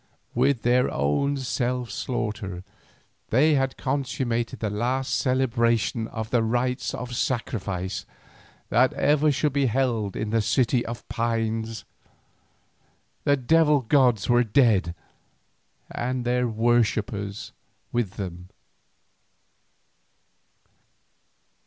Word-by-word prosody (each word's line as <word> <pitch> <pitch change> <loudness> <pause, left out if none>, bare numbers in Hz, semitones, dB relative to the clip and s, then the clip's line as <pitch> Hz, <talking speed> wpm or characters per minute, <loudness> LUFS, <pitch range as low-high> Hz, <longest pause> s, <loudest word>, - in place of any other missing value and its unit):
With 130 0 +2
their 125 +1 +3
own 75 - 0
self 125 -2 -2
slaughter 105 -6 -4 0.7
they 150 +7 +4
had 135 -2 0
consummated 130 -3 -2
the 105 -2 -2
last 125 +5 -1
celebration 115 -3 +1
of 110 -1 -6
the 120 - +3
rites 125 +3 -1
of 125 0 -6
sacrifice 100 -7 -2 0.6
that 125 +2 +3
ever 150 +1 +3
shall 145 +2 0
be 140 -1 +1
held 115 -5 0
in 105 0 -3
the 115 0 +2
City 120 +2 +2
of 120 +1 -7
Pines. 115 -1 -2 1.4
The 145 0 +4
devil 150 +2 +3
gods 125 -4 +3
were 120 0 +4
dead 105 -7 +2 1.0
and 125 0 -2
their 125 0 +1
worshippers 110 -3 0 0.4
with 115 -6 -1
them. 90 -3 -6
120 Hz, 100 wpm, -25 LUFS, 110-130 Hz, 1.4 s, they